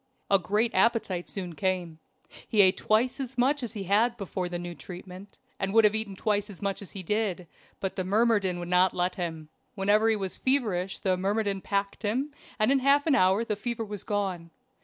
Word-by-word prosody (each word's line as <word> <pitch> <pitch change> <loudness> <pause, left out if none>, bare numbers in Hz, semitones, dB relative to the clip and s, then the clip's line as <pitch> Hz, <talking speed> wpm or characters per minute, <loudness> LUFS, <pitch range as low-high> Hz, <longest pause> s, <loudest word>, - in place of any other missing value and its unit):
A 195 - +6
great 210 +5 0
appetite 190 -4 +1
soon 180 -4 -5
came; 180 -3 -2 0.5
he 215 - +4
ate 185 -1 +4
twice 230 +5 +1
as 265 -1 -5
much 270 +4 +2
as 235 -2 -2
he 205 -3 -5
had 220 +5 +2
before 185 -3 -4
the 175 - -3
new 175 0 -6
treatment, 185 +3 -11 0.2
and 195 +1 -2
would 225 - +7
have 210 -1 +5
eaten 220 -3 -2
twice 205 +1 0
as 195 - -10
much 200 -1 -2
as 200 - -10
he 195 - -6
did, 200 -2 -1 0.3
but 190 - -3
the 185 - -1
myrmidon 200 -2 +2
would 175 0 -5
not 180 +1 +3
let 180 +1 0
him. 160 -3 -5 0.3
Whenever 210 +3 +3
he 220 - +3
was 195 -3 -3
feverish 210 -9 +1
the 185 -2 0
myrmidon 200 +1 -1
packed 200 0 -2
him, 255 +8 -1 0.2
and 215 +4 +3
in 275 - +4
half 280 +2 +3
an 315 - +3
hour 200 -2 +3
the 210 - -1
fever 230 +2 -3
was 205 -2 -6
gone. 190 -5 -2
200 Hz, 205 wpm, -27 LUFS, 185-225 Hz, 0.5 s, would